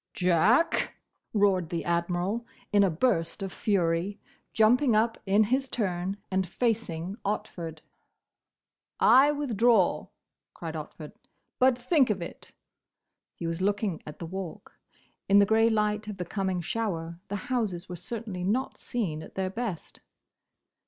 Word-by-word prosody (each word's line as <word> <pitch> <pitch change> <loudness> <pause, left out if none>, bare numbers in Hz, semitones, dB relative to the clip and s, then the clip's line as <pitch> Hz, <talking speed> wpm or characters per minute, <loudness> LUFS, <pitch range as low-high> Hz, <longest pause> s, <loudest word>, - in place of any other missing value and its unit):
"Jack!" 190 - +3 0.4
roared 195 -5 +2
the 170 -1 -3
Admiral, 175 +6 0 0.3
in 205 -1 +6
a 195 - +4
burst 175 0 0
of 195 - -5
fury, 180 -1 0 0.3
jumping 235 +3 +4
up 225 +1 +2
in 200 +3 +5
his 260 +5 0
turn 190 -3 -2
and 190 -1 +1
facing 195 -3 -2
Otford. 175 -6 -4 1.2
"I 275 +3 +7
withdraw!" 235 -8 +2 0.5
cried - - -6
Otford. - - -7 0.5
"But 255 -1 +5
think 260 +1 +3
of 205 -3 0
it!" 170 - -9 0.8
He - - -6
was 165 +1 -2
looking 200 -3 0
at 150 - -8
the 170 - -6
Walk. 185 0 -7 0.6
In 200 - +6
the 200 - +7
grey 225 +2 +4
light 210 -1 0
of 210 -2 -5
the 180 - -4
coming 190 -1 -2
shower 170 -4 -3
the 205 - -3 0.2
houses 200 -8 -1
were 180 - -6
certainly 210 0 -5
not 225 +8 -1
seen 180 -11 -3
at 160 - -12
their 190 -1 -1
best. 220 -6 -5
200 Hz, 140 wpm, -28 LUFS, 175-225 Hz, 1.2 s, I